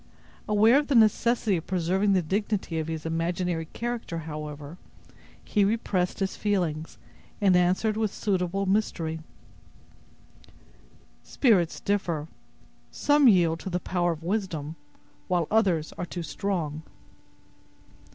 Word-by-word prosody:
Aware 220 +5 +5
of 295 - -3
the 280 - +1
necessity 225 -2 +3
of 165 - -7
preserving 190 +3 +1
the 185 -2 +2
dignity 195 -1 -1
of 160 - -3
his 160 -1 -5
imaginary 165 +1 -1
character, 235 -2 -4
however, 150 0 -7 0.7
he 205 - +2
repressed 195 -3 0
his 190 -1 -1
feelings, 170 -7 -2 0.4
and 195 -4 +4
answered 185 +5 +2
with 220 -2 0
suitable 195 -1 -1
mystery: 175 -5 -1 2.0
"Spirits 195 - +2
differ; 170 -7 -1 0.6
some 290 -1 +3
yield 170 -6 +4
to 190 - -6
the 180 0 -1
power 175 -1 0
of 160 0 -11
wisdom, 170 -6 -2 0.5
while 175 -2 +1
others 185 -8 +2
are 175 - -2
too 175 0 -5
strong." 160 -3 -3
180 Hz, 120 wpm, -27 LUFS, 165-205 Hz, 2.0 s, Aware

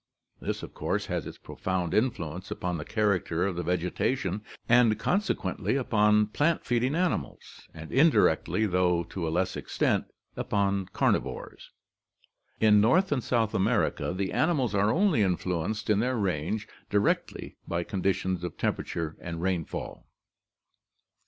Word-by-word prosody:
This - - -4
of - - -8
course - - -2
has - - -3
its - - -9
profound 90 -3 -3
influence 95 -7 -1
upon 90 -2 -3
the 75 - -6
character 100 -5 0
of 100 -3 -2
the 90 - -2
vegetation 90 +4 -1 0.3
and 115 -2 +5
consequently 200 -7 -1
upon 105 -5 +3
plant 145 +10 0
feeding 125 +3 +1
animals 180 +1 -3
and 80 0 -10
indirectly, 135 -6 +3
though 90 -3 +2
to 85 -1 -5
a - - 0
less 90 +3 0
extent, - - 0 0.3
upon 100 -2 0
carnivores. 100 - -2 0.9
In 105 -1 +6
North 155 - +3
and 130 -5 0
South 115 -3 +1
America 105 0 +1
the 95 +2 -2
animals 140 - +1
are 100 +2 +3
only 180 - +3
influenced 95 +2 -1
in 105 -1 +3
their 125 +3 +1
range 95 +1 -1 0.2
directly 100 0 0
by 85 0 -1
condi 95 0 0
tions 95 -1 -3
of 90 - -5
temperature 80 -2 -2
and 85 -1 -5
rainfall. 90 -3 -3
100 Hz, 140 wpm, -28 LUFS, 90-115 Hz, 0.9 s, In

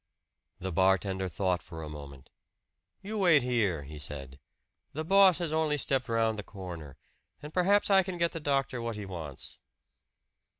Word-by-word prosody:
The 95 +1 -4
bartender 95 +1 +2
thought 90 0 0
for 80 +1 -9
a - - -6
moment. 70 -3 -10 0.7
"You 210 +2 -4
wait 170 -8 +5
here," 105 -11 0
he 75 +2 -9
said. 70 -1 -7 0.5
"The 155 - -3
boss 195 0 +6
has 170 -3 -2
only 155 -2 +1
stepped 135 -2 0
round 115 -1 +1
the - - -4
corner; 85 -9 -9 0.5
and 150 +1 -8
perhaps 200 +3 +3
I 195 -1 +7
can 185 -1 -5
get 170 0 +1
the 165 - -5
doctor 135 -4 0
what 115 -1 -3
he 105 -1 -6
wants." 80 -8 -7
110 Hz, 165 wpm, -30 LUFS, -, 0.7 s, I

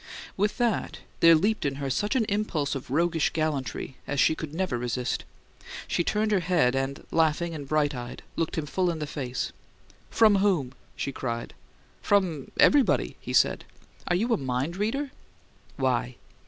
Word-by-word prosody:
With 205 +2 0
that, 240 -3 -1 0.2
there 165 0 +8
leaped 205 +7 +1
in 140 -1 -1
her 140 -1 -3
such 205 - 0
an 235 -4 +3
impulse 200 -9 -1
of 135 -3 -6
roguish 165 +3 +2
gallantry 145 -4 -2
as 140 - -1
she - - +5
could 155 -2 -6
never 175 -4 -1
resist. 125 +1 -2 0.6
She 170 - +1
turned 215 +3 0
her 200 - +4
head, 170 -8 +2
and, 135 +1 -2
laughing 165 +1 +2
and 145 -3 -6
bright 150 0 +1
eyed, 120 -2 -7
looked 165 0 -2
him 155 - -1
full 180 +5 0
in 170 - -2
the 155 - -3
face. 135 -4 -4 0.6
"From 215 -3 +5
whom?" 185 -10 +2 0.2
she 140 - -3
cried. 115 -3 -4 0.5
"From 180 -9 +1
everybody!" 285 -3 +4
he - - -6
said. - - +3 0.4
"Are 175 - +2
you 230 +6 +1
a - - +2
mind 135 +4 -2
reader?" 255 +8 -1 0.7
"Why?" 125 -2 0
155 Hz, 170 wpm, -27 LUFS, 135-195 Hz, 0.7 s, there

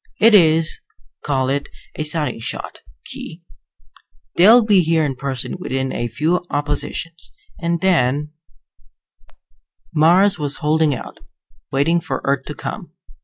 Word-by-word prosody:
It 220 +3 +6
is 160 -4 +4 0.4
call 135 -3 0
it 140 +1 -2 0.3
a 155 - -3
sighting 150 -4 -2
shot, 115 - -6 0.3
Khee. - - -8 1.0
They'll 220 +7 +7
be 205 -3 +5
here 165 -1 +1
in 135 -2 -2
person 135 +4 -4
within 130 -5 -3
a 120 - -2
few 155 - 0
oppositions. 160 +3 -3 0.3
And 170 -1 -1
then 150 -5 +1 0.8
" - - -38
Mars 175 +5 +4
was 145 -1 -2
holding 155 -1 +1
out, - - -9 0.5
waiting 160 +5 +2
for 160 - -3
Earth 140 -1 0
to - - -7
come. - - -7
155 Hz, 130 wpm, -19 LUFS, 140-170 Hz, 1.0 s, They'll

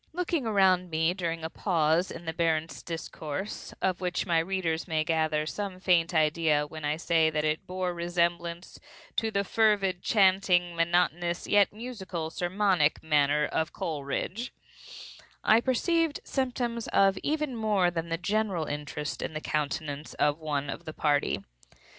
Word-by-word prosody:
Looking 335 -7 -1
around 190 -4 +3
me 160 +1 +1
during 165 -3 -3
a 160 - -3
pause 165 -1 +1
in 165 +1 -8
the 160 - -3
Baron's 160 -1 0
discourse 165 +2 -5
(of 190 0 0
which 180 -1 -1
my 170 -2 +3
readers 165 -2 -1
may 160 -2 +1
gather 155 -1 +1
some 190 +2 -4
faint 175 -2 +3
idea 155 -2 +2
when 155 +1 -9
I 150 +1 0
say 165 -1 +3
that 155 -1 -1
it 155 +1 -1
bore 185 -1 -2
resemblance 170 0 -2 0.4
to 225 - +1
the 200 -2 0
fervid, 200 -4 +2
chanting, 185 -4 +3
monotonous, 175 0 +1
yet 205 -1 +4
musical 195 -8 -5
sermonic 180 -3 +1
manner 150 -1 +3
of 160 +2 -2
Coleridge), 160 - -3 0.9
I 220 +2 +5
perceived 320 +5 +1
symptoms 245 -3 -2
of 195 -1 +3
even 300 -3 -1
more 210 -5 +2
than 170 -1 -3
the 165 - -1
general 195 -2 0
interest 150 0 -4
in - - -4
the - - -1
countenance 150 -1 -3
of 150 +1 +1
one 145 -3 -2
of 170 - -8
the 155 - -6
party. 145 -10 +1
170 Hz, 150 wpm, -28 LUFS, 160-195 Hz, 0.9 s, I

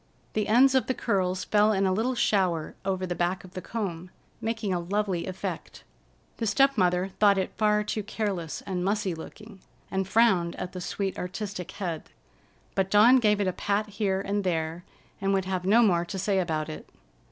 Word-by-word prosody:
The 215 -1 0
ends 255 +5 +5
of 260 - +2
the 260 - 0
curls 185 -4 0
fell 210 0 +3
in 195 -2 +1
a 190 - +2
little 235 +6 0
shower 185 -8 +1
over 190 -1 -1
the 180 - -2
back 175 +2 -1
of 185 - -13
the 185 - -5
comb, 185 -6 -4 0.3
making 225 -3 -2
a 175 - 0
lovely 185 -1 -1
effect. 185 0 -6 0.5
The 225 - -2
step 275 +7 +4
mother 180 -2 +2
thought 205 -2 +5
it 190 - -2
far 210 -1 +2
too 210 +1 -2
careless 200 -6 -3
and 180 -2 -3
mussy 200 -1 0
looking, 200 +5 -11 0.3
and 190 -1 -1
frowned 190 -6 +3
at 180 - -5
the 185 -1 -7
sweet, 195 +1 -3
artistic 185 0 -5
head, 170 -6 -4 0.6
but 195 -1 0
Dawn 220 +6 +7
gave 210 -4 +3
it 200 - +1
a 185 - 0
pat 205 +3 -1
here 200 -2 -1
and 200 +1 -1
there 165 -1 -2 0.4
and 195 0 +2
would 190 -1 0
have 185 -1 -2
no 225 +5 +5
more 175 -6 +3
to 190 - -6
say 195 0 +1
about 160 -4 -1
it. 155 - -8
195 Hz, 195 wpm, -27 LUFS, 180-210 Hz, 0.6 s, Dawn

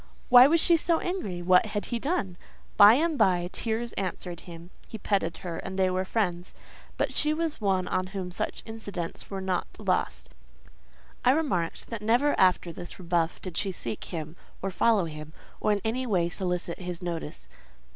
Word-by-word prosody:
"Why 250 +1 +10
was 330 +3 +3
she 335 +1 +5
so 330 +1 +1
angry? 205 - -3
What 185 +4 +5
had 210 -1 -3
he 235 - 0
done?" 225 - -1 0.4
By 205 +3 +9
and 315 +1 0
by 175 -2 +3
tears 230 +1 -2
answered 180 -2 -4
him; 170 +1 -11 0.2
he 220 - -7
petted 190 -5 -1
her, 170 -2 -4
and 190 0 -6
they 185 -1 +2
were 185 +1 -1
friends. 180 -4 -2 0.4
But - - 0
she 305 +1 +1
was 320 -5 -2
one 190 -3 +1
on 185 0 -1
whom 190 -2 -5
such - - -3
incidents 200 -6 -5
were 195 -1 -4
not 185 -1 -1
lost: - - -1 0.9
I - - +4
remarked 255 - 0
that 230 -2 -4
never 240 +7 +3
after 180 -2 +3
this 175 +1 -9
rebuff 170 -2 -1
did 180 -3 -6
she 195 - 0
seek 120 -10 -5
him, 160 -2 -6 0.2
or 195 - -3
follow 210 -1 +3
him, 155 -1 -8 0.3
or 215 - +1
in 205 -1 +1
any 250 +3 -1
way 175 -6 +1
solicit 180 -1 -3
his 180 -1 -6
notice. 160 - -5
190 Hz, 180 wpm, -27 LUFS, 175-225 Hz, 0.9 s, Why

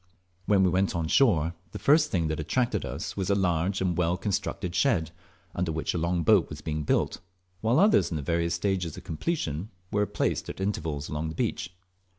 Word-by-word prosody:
When 100 -2 +4
we 90 - +3
went 95 +1 +1
on 80 -2 -1
shore 85 - +3 0.2
the - - -4
first 150 +2 +4
thing 85 -4 0
that 80 - -2
attracted 120 - 0
us - - -5
was 95 -1 -2
a 100 - +4
large 95 0 +1
and 90 -2 +1
well 90 +1 +1
constructed 95 -3 -2
shed, 90 - +2 0.4
under 90 -2 -1
which 80 0 -2
a 85 - -1
long 85 +1 0
boat 90 -3 +4
was 75 - -7
being 75 0 -3
built, 75 - 0 0.4
while 115 +5 +2
others 210 - +4
in 80 - -1
various 85 +3 0
stages 90 -2 -1
of - - -9
completion 85 - -3 0.2
were 105 0 +1
placed - - -1
at - - -7
intervals 80 -7 -2
along 75 +1 -3
the 80 - -7
beach. 85 +3 -2
90 Hz, 195 wpm, -27 LUFS, 80-100 Hz, 0.4 s, When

